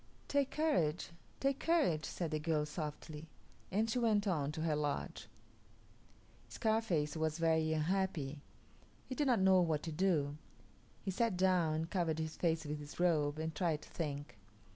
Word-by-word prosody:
"Take 280 -1 +2
courage, 175 - +1 0.3
take 275 0 +1
courage," 290 - +2
said 170 -3 -3
the 155 - 0
girl 150 -1 +1
softly, 150 0 -6 0.4
and 215 +4 +2
she 225 +2 0
went 220 -3 +3
on 150 -7 0
to 160 - -4
her 160 -2 +1
lodge. 145 -1 -2 1.2
Scarface 215 -10 0
was 160 0 0
very 160 -1 +2
unhappy. 155 -3 0 0.6
He - - -5
did 290 +2 0
not 245 -5 +4
know 190 -1 +6
what 160 -4 +1
to 165 - -4
do. 150 -4 +1 0.7
He 195 - -1
sat 220 0 +1
down 180 -4 +3
and 160 +1 -2
covered 170 -5 0
his 160 0 -3
face 165 -2 0
with 150 0 -3
his 145 +2 -10
robe, 155 -4 +2
and 160 0 -3
tried 160 -3 0
to - - -14
think. 145 -7 -4
160 Hz, 165 wpm, -36 LUFS, 150-190 Hz, 1.2 s, know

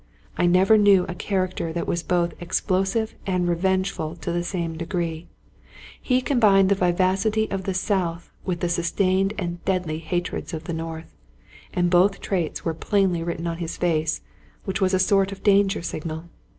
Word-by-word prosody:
I 175 - +2
never 190 +5 +5
knew 200 -3 +5
a 175 - -4
character 185 -2 -2
that 170 - -2
was 170 - -1
both 175 -1 0
explosive 195 +5 0
and 180 -2 +1
revengeful 175 -2 0
to 175 - -5
the 175 0 -1
same 170 -2 -3
degree; 165 0 -3 0.7
he 255 -1 +2
combined 205 -8 +4
the - - +5
vivacity 190 +4 +1
of 190 -1 -3
the 190 - -2
south 180 -3 -1
with 180 -2 -3
the 175 - +1
sustained 185 +3 +1
and 175 -3 -4
deadly 180 -5 -1
hatreds 175 +1 -3
of 155 - -6
the 170 - -4
north; 160 0 -6 0.6
and 175 -1 +1
both 185 +3 +4
traits 175 -6 -2
were 165 - 0
plainly 185 0 +1
written 170 0 -3
on 165 -1 -2
his 170 -1 -4
face, 160 -2 0 0.4
which 195 +1 -2
was 190 0 +3
a - - +3
sort 195 +1 +3
of 195 - -9
danger 200 -2 +3
signal. 160 -1 -4
180 Hz, 170 wpm, -24 LUFS, 170-195 Hz, 0.7 s, never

